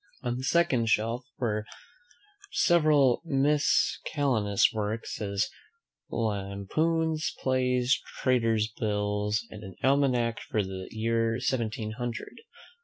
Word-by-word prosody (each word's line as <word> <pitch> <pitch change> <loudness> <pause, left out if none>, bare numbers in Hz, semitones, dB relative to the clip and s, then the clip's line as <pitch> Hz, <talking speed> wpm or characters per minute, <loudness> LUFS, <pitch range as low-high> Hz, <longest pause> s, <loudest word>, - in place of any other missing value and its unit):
On 120 -1 -1
the 130 - -5
second 135 -7 +2
shelf 115 +4 +1
are 110 -4 -1 0.9
several 150 -7 +4
miscellaneous 140 - +2
works, 110 +1 -3
as 100 0 -1 0.6
Lampoons. 115 +11 -1
Plays. 125 0 +1 0.2
Tailors' 115 -4 +2
bills. 105 0 0
And 105 - -9
an 95 -2 -9
almanack 130 -4 +2
for 105 - +1
the 95 -1 -6
year 115 +1 0
seventeen 115 -4 -2
hundred. 120 - -5
115 Hz, 100 wpm, -28 LUFS, 105-135 Hz, 0.9 s, several